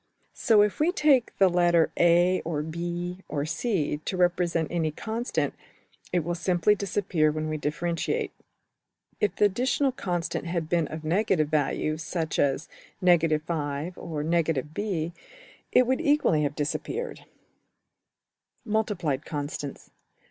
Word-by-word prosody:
So 220 -4 +4
if 210 - -1
we 315 +4 +3
take 295 -8 +3
the 195 - +6
letter~$a$, 175 0 +3
or~$b$, 170 +3 -3
or~$c$ 155 - -1
to 185 - -3
represent 175 -3 +1
any 165 -2 0
constant, 225 - -2 0.6
it 175 -2 +1
will 175 +2 -2
simply 175 +3 +2
disappear 190 -6 0
when 155 +1 -3
we 155 - -2
differentiate. 165 +3 -2 0.9
If 205 -3 +1
the 210 - +4
additional 255 +7 +1
constant 175 -8 -3
had 170 -2 -2
been 165 -1 +1
of 155 0 -7
negative 170 -2 +1
value, 155 0 0
such 160 0 -3
as 140 +2 +1 0.4
$ 175 -2 +6
5$~or~$ 155 0 -1
b$, 170 0 -3 0.6
it 255 - +5
would 260 +5 +1
equally 290 - +3
have 145 -1 -1
disappeared. 390 - -3 1.4
\Subsection{Multiplied 195 -10 0
Constants. 145 -1 -5
170 Hz, 120 wpm, -27 LUFS, 155-200 Hz, 1.4 s, the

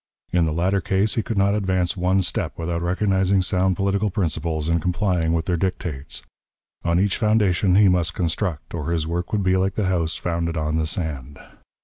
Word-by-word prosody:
In 90 -2 +3
the - - 0
latter 90 +5 +1
case, 95 +4 +1
he 115 - 0
could 110 0 -4
not 100 +1 +3
advance 95 -4 0
one 95 +1 +1
step - - -3
without 85 0 -2
recognizing 95 +1 +1
sound 95 -1 +1
political 100 +3 0
principles 80 -4 -2
and 85 0 +1
complying 90 -2 0
with 80 -1 0
their 90 -2 0
dictates. 85 -6 -3 0.6
On 85 0 +2
each 100 0 +1
foundation 105 -4 +2
he 100 0 +6
must 85 -3 +1
construct, 85 -1 -2
or 80 -2 -3
his 85 -2 0
work 85 +2 -3
would 105 -2 0
be 95 0 +3
like 95 +1 0
the 105 - 0
house 85 -3 0
founded 85 -1 -2
on 75 +1 -1
the 80 -1 0
sand. 75 -5 -4
90 Hz, 195 wpm, -23 LUFS, 85-95 Hz, 0.6 s, he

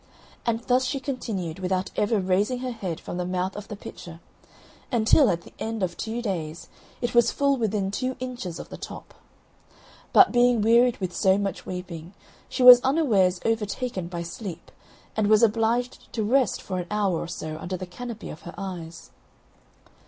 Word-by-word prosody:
And 230 0 +1
thus 250 +1 +2
she 275 +1 -1
continued 205 - -4
without 185 0 -1
ever 210 +1 +1
raising 195 +6 +1
her 255 -1 -3
head 185 -8 -4
from - - -6
the 180 - -1
mouth 180 +1 -2
of 205 -1 -7
the 210 - -6
pitcher 170 -4 -10 0.7
until, 240 +3 +5
at 170 -1 0
the - - -15
end 225 -2 -3
of 175 -2 -1
two 230 +2 -4
days, 170 -6 -4 0.3
it 240 -1 -1
was 235 -1 +5
full 280 -1 +2
within 210 -5 -1
two 255 +5 -2
inches 245 -9 -5
of - - -9
the - - -8
top. - - -9 1.0
But, 385 - +7
being 245 -2 +4
wearied 235 +2 +4
with 185 -2 -4
so 190 0 +4
much 200 -1 -3
weeping, 180 -1 -7 0.3
she 255 - -1
was 250 -1 +11
unawares 230 - +2
overtaken 225 -3 -1
by 170 -1 -5
sleep, 170 0 -8 0.4
and 215 -1 +1
was 215 +1 +5
obliged 230 +3 +1
to 220 - -1
rest 250 +2 +2
for 185 -1 -3
an 175 - -5
hour 200 -5 +1
or - - -4
so 155 -2 -5
under 185 +3 -4
the 185 - -6
canopy 230 +5 -7
of 155 - -10
her 175 - -9
eyes. 175 -4 -7
210 Hz, 180 wpm, -25 LUFS, 180-240 Hz, 1.0 s, was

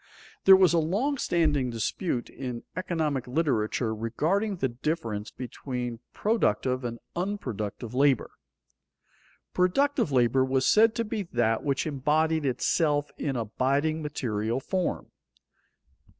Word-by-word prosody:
There 190 - +10
was 185 -2 +5
a 170 - +4
long 220 - 0
standing 150 - +1
dispute 120 - -2
in 125 -3 -6
economic 155 -8 -1
literature 125 -5 0
regarding 160 - 0
the 150 -7 0
difference 120 -5 -3
between 125 -2 -5
productive 130 - 0
and 120 -1 -4 0.2
unproductive 125 - -4
labor. 135 -1 +2 1.2
Productive 185 - +2
labor 130 0 +3
was 130 0 +1
said 225 +1 +5
to 230 - 0
be 215 0 -3
that 115 -2 +1
which 140 +1 0
embodied 155 +1 +1
itself 145 +3 +1
in 140 -3 -2
abiding 135 +7 0
material 120 -5 -2
form. 185 +6 -2
140 Hz, 115 wpm, -27 LUFS, 120-170 Hz, 1.2 s, There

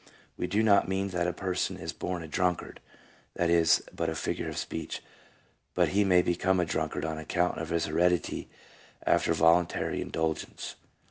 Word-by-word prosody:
We 90 - -2
do 105 +5 +1
not 100 -2 +5
mean 95 +1 0
that 90 -2 0
a - - +1
person 95 0 -2
is - - -5
born 90 -2 -4
a - - -7
drunkard 90 +2 -1 0.3
— - - -30
that 85 -1 +1
is 85 -1 +4
but 85 -1 -1
a 80 - -3
figure - - -2
of - - -6
speech; 80 - -4 0.7
but - - +3
he 100 +2 +3
may 90 -2 +4
become 90 +2 +1
a 90 - +2
drunkard 80 -1 -2
on 80 -1 -3
account 90 +3 0
of 80 0 -4
his 85 0 +1
heredity 85 +1 0 0.6
after - - +3
voluntary 85 +2 +2
indulgence. 80 -1 -3
85 Hz, 180 wpm, -29 LUFS, 80-90 Hz, 0.7 s, not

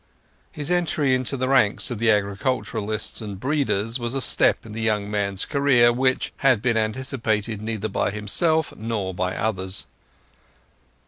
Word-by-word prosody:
His 150 +2 -3
entry 160 -6 +1
into 130 +1 -1
the 130 0 -1
ranks 130 -4 +2
of 120 - -4
the 115 0 +2
agriculturists 105 +1 -1
and 100 -3 -6
breeders 130 -4 0
was 120 +2 -3
a - - 0
step 115 - +3
in 110 - -9
the 115 - -5
young 105 -2 0
man's 100 -2 -1
career 135 -5 +4
which 130 +1 0
had 130 -5 +3
been 120 +1 0
anticipated 110 -2 -1
neither 110 -1 -3
by 100 - -1
himself 150 - 0
nor 105 -4 -3
by 90 0 -2
others. 95 -3 -2
110 Hz, 150 wpm, -23 LUFS, 105-130 Hz, -, career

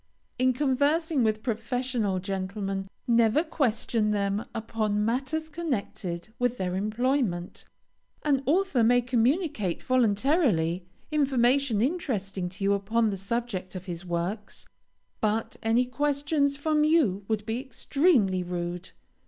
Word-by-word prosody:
In 255 0 +4
conversing 285 +2 +1
with 215 -1 0
professional 235 -3 -1
gentlemen, 195 +1 -3 0.2
never 235 +5 +4
question 230 -7 0
them 200 0 0
upon 215 -2 -1
matters 265 +7 -1
connected 215 - -4
with 245 0 +1
their 180 -1 -2
employment. 215 -3 -1 0.6
An 280 -3 +3
author 335 -5 +2
may 245 +2 +5
communicate, 250 - 0
voluntarily, 210 - +2 0.2
information 265 -5 +2
interesting 210 - -1
to 195 +3 -7
you, 200 0 +3
upon 215 +3 +1
the - - -2
subject 195 -2 -3
of 185 0 -6
his 175 -1 -5
works, 180 +4 -4 0.5
but 220 +1 0
any 230 +3 +2
questions 285 +2 0
from 300 +1 +1
you 295 - +3
would 215 -2 -1
be 225 +2 -2
extremely 260 - +2
rude. 175 0 -4
230 Hz, 120 wpm, -27 LUFS, 195-275 Hz, 0.6 s, may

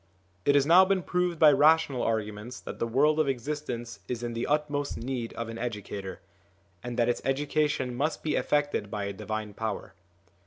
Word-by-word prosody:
It 140 - +4
has 140 -1 +5
now 175 +4 +8
been 190 -1 +1
proved 180 +1 0
by 155 -1 +7
rational 145 -2 +4
arguments 110 +2 -2
that - - -8
the 115 - 0
world 150 +6 +3
of 155 - +3
existence 125 -3 -4
is 120 -1 -4
in 120 -1 -3
the 115 +1 -2
utmost 145 -1 -1
need 120 -1 -4
of 115 - -4
an 115 0 -7
educator, 105 -4 -5 0.6
and 120 0 -5
that 120 - +3
its 120 - 0
education 145 -1 0
must 145 +6 -1
be 155 - 0
effected 145 -8 0
by 105 -1 -3
a 100 0 -3
divine 105 +1 -5
power. 110 0 -4
125 Hz, 185 wpm, -28 LUFS, 115-150 Hz, 0.6 s, now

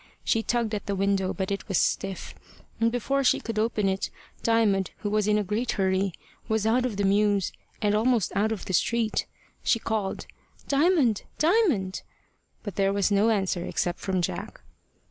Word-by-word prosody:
She 225 - +2
tugged 235 -1 -1
at 210 - -3
the 200 - -1
window, 195 -1 +1
but 190 0 -3
it 200 - -3
was 195 - +1
stiff; 195 -1 -1 0.5
and 230 0 +3
before 275 +3 0
she 255 - +4
could 225 -2 -3
open 215 -2 +1
it, 190 0 -1 0.3
Diamond, 215 -5 +2
who 205 - -2
was 210 -1 +1
in 210 0 +3
a 210 - +1
great 220 +5 -1
hurry, 190 0 +1 0.4
was 220 -2 0
out 245 +3 +3
of 215 -5 -5
the 200 - 0
mews, 200 -1 +2 0.3
and 205 0 +3
almost 225 0 +2
out 215 +2 +2
of 220 - -4
the 185 - -4
street. 225 +6 +1 0.4
She - - +3
called 220 -3 -2 0.4
"Diamond! 285 - +3 0.2
Diamond!" 310 - +2 0.6
but 205 -5 -6
there 195 -1 +3
was 200 0 +1
no 205 +3 +4
answer 190 -5 0
except 175 0 -2
from 185 -2 -1
Jack. - - -4
210 Hz, 180 wpm, -26 LUFS, 195-230 Hz, 0.6 s, she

